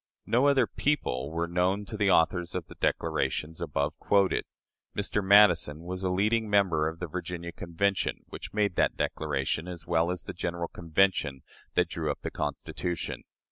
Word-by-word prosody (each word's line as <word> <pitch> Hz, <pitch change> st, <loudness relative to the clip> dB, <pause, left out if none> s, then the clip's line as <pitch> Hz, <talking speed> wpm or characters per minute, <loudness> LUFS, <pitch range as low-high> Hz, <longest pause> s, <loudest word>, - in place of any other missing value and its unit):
No 125 Hz, +5 st, +3 dB
other 135 Hz, -3 st, +4 dB
people 70 Hz, -, -1 dB
were 85 Hz, +1 st, -2 dB
known 90 Hz, +4 st, +1 dB
to 110 Hz, -, -7 dB
the 105 Hz, -2 st, +2 dB
authors 85 Hz, 0 st, +2 dB
of -, -, -2 dB
the -, -, -12 dB
declarations 80 Hz, +1 st, -1 dB
above 75 Hz, +2 st, -2 dB
quoted. 100 Hz, -2 st, +2 dB, 0.5 s
Mr. 105 Hz, 0 st, 0 dB
Madison 95 Hz, -6 st, +5 dB
was 90 Hz, +2 st, -5 dB
a 95 Hz, -, +1 dB
leading 105 Hz, +4 st, +1 dB
member 95 Hz, -7 st, +3 dB
of 80 Hz, +1 st, -4 dB
the 90 Hz, -, -4 dB
Virginia 85 Hz, 0 st, -5 dB
Convention, 90 Hz, +4 st, -1 dB
which -, -, -8 dB
made 105 Hz, -2 st, +1 dB
that -, -, +2 dB
declaration, 70 Hz, +5 st, -1 dB
as 85 Hz, -3 st, -7 dB
well 85 Hz, +1 st, +2 dB
as 90 Hz, -2 st, -3 dB
of -, -, -29 dB
the -, -, -5 dB
general 85 Hz, -1 st, -3 dB
Convention 80 Hz, -5 st, +1 dB, 0.3 s
that 90 Hz, -1 st, +3 dB
drew 80 Hz, -2 st, -3 dB
up 70 Hz, -, -3 dB
the -, -, -4 dB
Constitution. 85 Hz, -2 st, -4 dB
90 Hz, 175 wpm, -28 LUFS, 80-100 Hz, 0.5 s, Madison